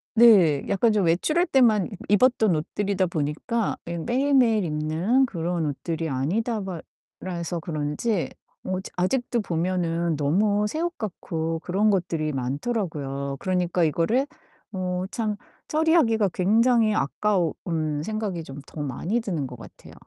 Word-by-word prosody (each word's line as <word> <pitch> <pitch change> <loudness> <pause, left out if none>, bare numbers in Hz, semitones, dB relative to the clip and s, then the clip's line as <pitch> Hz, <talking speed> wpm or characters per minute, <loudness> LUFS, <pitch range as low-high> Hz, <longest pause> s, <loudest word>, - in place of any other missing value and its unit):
네 195 -11 +6
약간 225 +4 +2
좀 210 -3 +2
외출할 305 - +2
때만 230 -7 +3 0.2
입었던 220 -3 +4
옷들이다 190 +5 -1
보니까 170 - -2
이 170 - -3
매일매일 245 - +2
입는 160 +12 +1
그런 170 -5 -2
옷들이 160 +2 -3
아니다바 190 - -2 0.4
라서 175 -2 -3
그런지 160 +5 -2 0.3
어 185 - -2 0.2
아직도 235 +6 0
보면은 170 -2 -1
너무 200 +8 +2
새 315 +8 -3
옷 345 0 -2
같고 165 -5 -3
그런 195 +5 +1
것들이 165 -5 -1
많더라고요. 140 - -3
그러니까 180 -2 0
이거를 170 - +2 0.5
어 185 -1 -2
참 215 -3 -1 0.3
처리하기가 305 - +3
굉장히 220 +3 +3
아까운 180 +2 +1 0.5
생각이 210 -4 -3
좀 140 -1 -9
더 150 - -8
많이 160 - -2
드는 170 -11 -2
것 125 - -10
같아요. - - -13
185 Hz, 285 characters per minute, -25 LUFS, 160-220 Hz, 0.5 s, 네